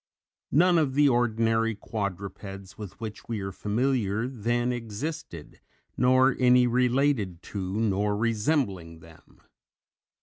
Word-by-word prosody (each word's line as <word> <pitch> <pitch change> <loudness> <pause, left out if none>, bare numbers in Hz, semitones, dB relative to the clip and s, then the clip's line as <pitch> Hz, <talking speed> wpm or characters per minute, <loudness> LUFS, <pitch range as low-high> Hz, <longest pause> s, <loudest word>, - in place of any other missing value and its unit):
None 175 +4 +4
of 135 -4 0
the 145 0 +5
ordinary 115 -2 +1
quadrupeds 100 -1 -6
with 105 -3 -9
which 110 -2 -7
we 115 -2 -3
are 95 0 -4
familiar 110 +1 -1
then 120 0 -1
existed, 115 - -6 0.4
nor 130 +1 +4
any 125 0 +5
related 125 -6 +1
to 95 0 -4
nor 105 -1 0
resembling 105 - -1
them. 80 -1 -19
115 Hz, 110 wpm, -27 LUFS, 100-125 Hz, 0.4 s, the